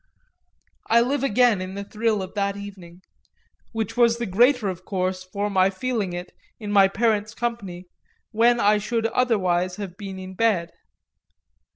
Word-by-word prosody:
I 230 - +6
live 265 +3 0
again 245 -5 +3
in 185 +1 -6
the 200 - -4
thrill 215 -1 -1
of 185 - -9
that 200 -1 -1
evening 185 -3 -11 0.7
which 225 -1 -3
was 235 -1 +4
the 235 - -3
greater 240 +4 +3
of 185 -1 -4
course 185 -1 -2
for 200 +3 -3
my 190 -2 +3
feeling 205 -2 -2
it, 175 +1 -6 0.3
in 210 -2 -5
my 200 -1 +6
parents' 215 +1 0
company, 205 -7 -4 0.5
when 235 +2 +3
I 210 0 +4
should 225 +2 -2
otherwise 185 -7 +1
have 190 -3 -7
been 195 -2 -7
in 190 0 -8
bed. 185 -5 +1
205 Hz, 160 wpm, -24 LUFS, 185-230 Hz, 0.7 s, I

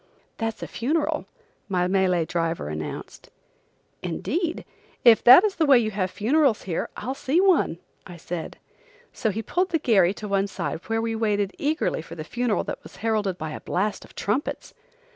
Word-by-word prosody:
"That's 225 -1 -3
a - - -4
funeral," 295 +7 -1 0.4
my 180 -2 +1
Malay 185 -2 +2
driver 165 - -2
announced. 75 0 -7 0.7
"Indeed! 320 - -2 0.4
If 230 -2 +7
that 255 +9 +10
is 420 -3 0
the 325 - +3
way 275 -2 +8
you 220 -2 +1
have 190 -2 -1
funerals 255 - +2
here, 175 -4 -3
I'll 260 - -3
see 275 +4 0
one," 370 - +3 0.3
I 175 -1 -10
said. 170 0 -6 0.6
So 220 - -1
he 215 +2 -3
pulled 365 - 0
the 330 - +2
gharry 200 - +3
to 210 - -7
one 195 0 +1
side 180 -4 -4
where 225 0 0
we 225 0 -1
waited 205 -3 0
eagerly 300 - 0
for 165 - -10
a 155 - -6
funeral 240 +5 -1
that - - -6
was - - -14
heralded 210 -5 0
by 155 -2 -5
a - - -6
blast 205 +3 -2
of - - -17
trumpets. 235 +9 -2
215 Hz, 180 wpm, -25 LUFS, 180-260 Hz, 0.7 s, that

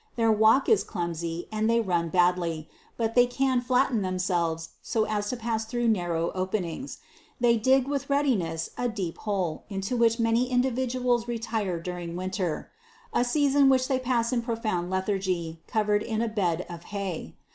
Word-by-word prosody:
Their 225 -1 +3
walk 220 +5 +4
is 440 - +4
clumsy, 170 -2 -4
and 215 +1 0
they 230 0 +4
run 175 -6 0
badly, 175 -3 +1 0.3
but 225 -1 0
they 245 0 +5
can 260 0 +1
flatten 250 -2 +2
themselves 175 -3 -1
so 220 - 0
as 210 -1 -2
to 250 - -2
pass 225 -1 -1
through 240 +1 0
narrow 175 -5 0
openings. 185 - -3 0.4
They 235 -1 +4
dig 260 +3 +3
with 280 -1 -2
readiness 200 - 0
a 245 - +1
deep 190 -7 -4
hole 190 -7 -2
into 195 +4 -2
which 230 0 +3
many 230 +2 +2
individuals 250 -1 +1
retire 220 -6 -2
during 175 0 -5
winter, 185 -2 -3 0.4
a - - +3
season 280 +1 +3
which 255 -1 +3
they 260 -1 +1
pass 245 -2 0
in 240 - +1
profound 220 -7 -2
lethargy, 185 -4 -2
covered 210 -2 +1
in 225 0 -1
a - - 0
bed 180 -5 0
of 170 0 -9
hay. 190 - -5
215 Hz, 165 wpm, -27 LUFS, 180-245 Hz, 0.4 s, they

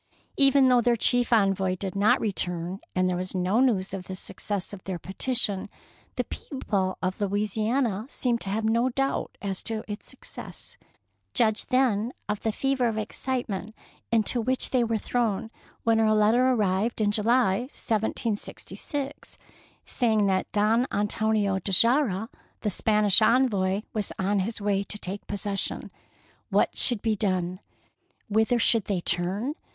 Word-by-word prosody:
Even 275 -1 +5
though 250 -1 +5
their 240 0 +3
chief 245 +2 +3
envoy 195 -4 +2
did 190 0 -5
not 200 +2 +4
return, 180 -3 -2 0.2
and 185 0 +2
there 180 - 0
was 185 +1 -5
no 185 +5 +1
news 205 -8 +1
of 190 -2 -5
the 190 - -6
success 200 +1 -4
of 190 - -9
their 190 -2 -3
petition, 200 +2 0 0.5
the - - 0
people 200 -9 -3
of 185 +3 -2
Louisiana 215 +3 0
seemed 240 -4 -1
to 195 - -5
have 215 +3 -1
no 230 +3 +2
doubt 270 +2 -2
as 195 -2 -2
to 220 -2 -3
its 210 0 -7
success. - - -9 0.6
Judge 220 -3 +2
then 250 -3 +1
of 210 -1 -2
the 220 - -1
fever 265 +1 0
of 225 -1 -2
excitement 220 -2 -3 0.4
into 230 +1 +2
which 255 +3 0
they 255 -2 +3
were 230 -1 0
thrown 225 -1 -1 0.3
when 225 -1 +3
a 215 -1 +3
letter 225 +5 +4
arrived 215 -1 +1
in 210 -1 +2
July, 215 -1 +2
1766, 235 +5 -4 0.5
saying 220 -4 +1
that 190 -1 0
Don 220 +4 +2
Antonio 205 -1 +1
de 195 - -4 0.2
Ulloa, 230 -6 +1 0.3
the 210 - -1
Spanish 210 0 +3
envoy, 215 -5 +2
was 210 -3 -2
on 195 +1 +1
his 215 +4 -2
way 200 -1 0
to 210 - -3
take 200 0 -5
possession. 200 -1 -3 0.6
What - - +2
should 240 -5 +2
be 220 -2 +1
done? 185 -3 -1 0.7
Whither 220 +3 +2
should 225 -2 +3
they 190 -4 -1
turn? 185 +11 0
215 Hz, 150 wpm, -26 LUFS, 195-235 Hz, 0.7 s, Even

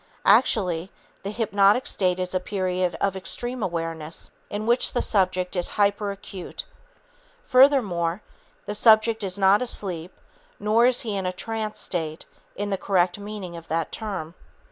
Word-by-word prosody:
Actually, 185 -8 +3 0.3
the 195 - -5
hypnotic 205 +1 +3
state 185 -2 +1
is 185 0 -3
a 185 - +1
period 185 -2 -1
of 195 -1 0
extreme 240 +7 -3
awareness 165 -3 -4 0.2
in 205 +1 -4
which 240 +2 +2
the 245 - +1
subject 185 -3 0
is 175 -1 0
hyperacute. 200 -2 -2 0.8
Furthermore, 210 - +3 0.4
the 210 - -4
subject 220 0 +4
is 190 -1 -2
not 195 +2 +4
asleep, 185 -8 -2 0.5
nor 220 +3 +4
is 250 -1 +3
he 215 -3 -3
in 190 -2 -2
a - - 0
trance 220 +3 -4
state 160 -3 -3 0.3
in 205 0 -3
the 195 - -1
correct 185 -1 +1
meaning 200 -4 -7
of 165 0 -10
that 165 +1 -2
term. 195 -7 -5
195 Hz, 145 wpm, -24 LUFS, 180-215 Hz, 0.8 s, subject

